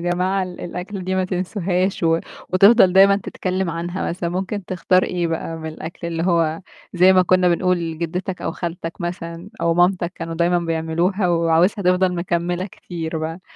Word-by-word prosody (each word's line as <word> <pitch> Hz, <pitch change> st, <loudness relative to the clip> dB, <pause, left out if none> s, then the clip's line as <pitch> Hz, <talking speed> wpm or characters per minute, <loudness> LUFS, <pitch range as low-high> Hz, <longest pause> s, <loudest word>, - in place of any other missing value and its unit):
جماعة 180 Hz, +3 st, 0 dB
ال 180 Hz, -1 st, -7 dB
الأكلة 180 Hz, +3 st, -6 dB
دي 185 Hz, +1 st, -2 dB
ما 185 Hz, 0 st, +1 dB
تنسوهاش 185 Hz, 0 st, -1 dB
و 165 Hz, 0 st, +3 dB, 0.3 s
وتفضل 195 Hz, +1 st, +6 dB
دايمُا 195 Hz, +1 st, +6 dB
تتكلِّم 185 Hz, -2 st, -3 dB
عنها 170 Hz, +2 st, -3 dB
مثلًا، 175 Hz, 0 st, -3 dB
ممكن 190 Hz, +2 st, -3 dB
تختار 185 Hz, +1 st, +1 dB
إيه 175 Hz, -2 st, -1 dB
بقى 165 Hz, 0 st, -3 dB
من 160 Hz, 0 st, -6 dB
الأكل 160 Hz, +2 st, -7 dB
اللي 165 Hz, -1 st, -2 dB
هو 165 Hz, -2 st, +1 dB, 0.3 s
زي 185 Hz, +2 st, +6 dB
ما 185 Hz, -, +5 dB
كُنّا 185 Hz, 0 st, +3 dB
بنقول 170 Hz, -2 st, 0 dB
جِدِّتك 180 Hz, +3 st, -4 dB
أو -, -, -2 dB
خالتك 170 Hz, +1 st, -5 dB
مثلًا، 175 Hz, 0 st, -5 dB
أو 165 Hz, 0 st, +2 dB
مامتك 175 Hz, 0 st, +2 dB
كانوا 165 Hz, 0 st, -5 dB
دايمًا 175 Hz, +1 st, +2 dB
بيعملوها 170 Hz, +3 st, 0 dB
وعاوزها 170 Hz, +4 st, +2 dB
تفضل 180 Hz, 0 st, +3 dB
مكمِّلة 175 Hz, +1 st, -1 dB
كتير 165 Hz, -4 st, -6 dB
بقى؟ 165 Hz, +3 st, -5 dB
175 Hz, 170 wpm, -21 LUFS, 170-185 Hz, 0.3 s, وتفضل